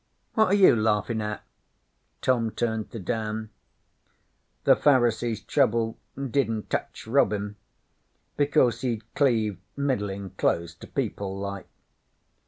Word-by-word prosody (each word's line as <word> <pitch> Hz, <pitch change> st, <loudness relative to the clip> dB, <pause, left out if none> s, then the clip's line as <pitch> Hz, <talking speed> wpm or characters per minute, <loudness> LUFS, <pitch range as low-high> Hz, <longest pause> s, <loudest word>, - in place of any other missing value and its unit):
What 220 Hz, 0 st, +4 dB
are 190 Hz, -, +1 dB
you 195 Hz, -10 st, +7 dB
laughin' 110 Hz, 0 st, +1 dB
at?' 105 Hz, 0 st, -4 dB, 0.8 s
Tom 120 Hz, -3 st, +2 dB
turned 110 Hz, -1 st, -2 dB
to -, -, -7 dB
Dan. 110 Hz, +1 st, -3 dB, 1.1 s
'The -, -, +6 dB
Pharisees's 120 Hz, -5 st, +2 dB
trouble 115 Hz, -4 st, +1 dB, 0.2 s
didn't 130 Hz, -5 st, -1 dB
tech -, -, -2 dB
Robin, 105 Hz, -4 st, +1 dB, 0.8 s
because 125 Hz, -5 st, +2 dB
he'd 115 Hz, -4 st, -2 dB
cleaved 110 Hz, -, +1 dB, 0.2 s
middlin' 100 Hz, -9 st, -2 dB
close 85 Hz, 0 st, 0 dB
to 85 Hz, -, -13 dB
people, 95 Hz, -1 st, -3 dB
like. 100 Hz, -1 st, -5 dB
110 Hz, 110 wpm, -26 LUFS, 105-125 Hz, 1.1 s, you